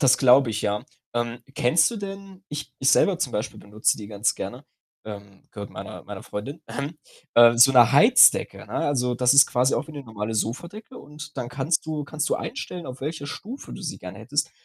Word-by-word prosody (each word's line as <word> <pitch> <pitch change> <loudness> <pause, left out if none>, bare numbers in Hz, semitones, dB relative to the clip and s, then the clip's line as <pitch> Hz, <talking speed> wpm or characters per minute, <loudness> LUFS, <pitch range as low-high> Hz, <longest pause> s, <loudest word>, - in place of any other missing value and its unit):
Das 135 -4 +4
glaube 130 -1 +5
ich, 105 -1 -3
ja. 105 0 -2 0.3
Ähm, 120 0 -2 0.2
kennst 160 - +3
du 235 - -6
denn 195 -2 -9
ich 150 0 -7
ich 135 - +3
selber 190 -4 +3
zum 135 -9 -2
Beispiel 105 +2 -4
benutze 105 +1 0
die 105 -2 -9
ganz 105 -1 0
gerne, - - -7 0.4
ähm, 100 -2 -10
gehört 100 -1 -8
meiner - - -9
meiner - - -9
Freundin, 135 +10 -7
ähm, 145 +3 -6 0.4
äh, 120 0 +7
so 125 +3 +7
'ne 125 -3 +6
Heizdecke, - - +5
ne? - - -23
Also, 125 -3 0
das 125 +1 +3
ist 140 +1 +8
quasi 125 +2 +1
auch - - -2
wie 160 - -11
'ne 145 -2 -8
normale 110 -2 -5
Sofadecke 170 - -5
und 150 0 -11
dann 125 -3 -4
kannst 145 +6 -1
du 155 -2 -3
kannst 155 +1 -3
du - - +1
einstellen, 180 -8 -6
auf 130 +1 -8
welcher 145 +1 -5
Stufe 240 - -8
du - - -9
sie 165 -2 -5
gerne 90 +1 -9
hättest. 145 +8 -2
135 Hz, 210 wpm, -24 LUFS, 115-155 Hz, 0.4 s, ist